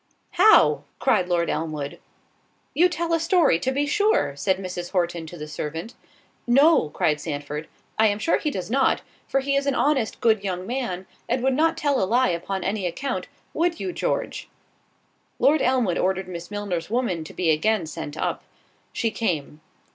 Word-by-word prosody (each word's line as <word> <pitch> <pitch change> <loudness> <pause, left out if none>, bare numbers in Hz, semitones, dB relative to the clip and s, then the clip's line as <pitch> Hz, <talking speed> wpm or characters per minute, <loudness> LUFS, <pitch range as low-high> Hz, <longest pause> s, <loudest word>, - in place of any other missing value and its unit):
"How!" 425 +5 +5
cried 180 0 +2
Lord 170 -1 +1
Elmwood. 155 -3 -3 0.7
"You 345 +6 +4
tell 340 0 -2
a 330 - +3
story, 330 - +3
to 260 - -1
be 285 +2 0
sure," 410 - +2
said 140 +7 0
Mrs. 180 -1 -6
Horton 175 -3 -1
to 175 - -9
the 150 -1 -7
servant. 160 +8 -5 0.5
"No," 275 - +5
cried 150 0 0
Sandford, 150 0 -5 0.3
"I 220 - +6
am 205 -1 +1
sure 270 +10 +1
he 305 - -1
does 190 -6 -5
not; 270 +1 +2 0.2
for 270 - +1
he 275 +1 0
is 275 0 0
an 275 - +1
honest 270 -7 +1
good 220 -3 +2
young 185 -2 -3
man, 220 -7 -3 0.2
and 245 +1 0
would 265 0 +3
not 325 +4 +2
tell 285 -2 +1
a - - +3
lie 240 +3 +3
upon 180 +2 -3
any 195 -1 -1
account—would 320 - -3
you, 365 - -3
George?" - - -2 0.9
Lord 300 +1 +4
Elmwood 245 -9 +2
ordered 190 0 0
Miss 170 -1 -7
Milner's 200 -5 -3
woman 225 -8 -1
to 155 - -11
be 170 -3 +2
again 200 +4 +1
sent 155 -1 -7
up. - - -2 0.5
She 225 - -1
came. 155 -9 -2
205 Hz, 175 wpm, -24 LUFS, 170-275 Hz, 0.9 s, I